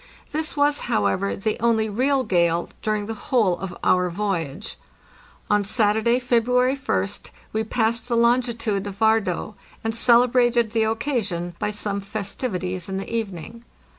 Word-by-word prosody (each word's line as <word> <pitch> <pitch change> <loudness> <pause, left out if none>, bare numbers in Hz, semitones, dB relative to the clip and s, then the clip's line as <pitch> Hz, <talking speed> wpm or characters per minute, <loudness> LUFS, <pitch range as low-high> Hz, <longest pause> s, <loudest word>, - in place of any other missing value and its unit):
This 310 0 -1
was, 290 0 +3
however, 105 - +1
the 215 +2 -2
only 225 -1 +2
real 260 +6 +1
gale 170 -4 +1
during 215 -1 -1
the 225 - -4 0.2
whole 210 -9 +2
of 190 -1 -6
our 180 0 +3
voyage. 180 -1 -3 0.7
On 210 0 +2
Saturday, 220 +3 +2
February 250 +1 +2
Ist, 95 - -2 0.2
we 220 0 0
passed 230 +1 -1
the 235 -2 0
longitude 235 -4 +1
of 200 -1 -7
Vard3é, 220 -3 +1 0.3
and 225 0 -1
celebrated 240 -1 +3
the 225 -1 +2
occasion 220 -7 -2
by - - -1
some 205 -1 -3
festivities 195 -3 -4
in 190 - -3
the 195 +4 -4
evening. 225 +1 -5
220 Hz, 140 wpm, -23 LUFS, 195-235 Hz, 0.7 s, was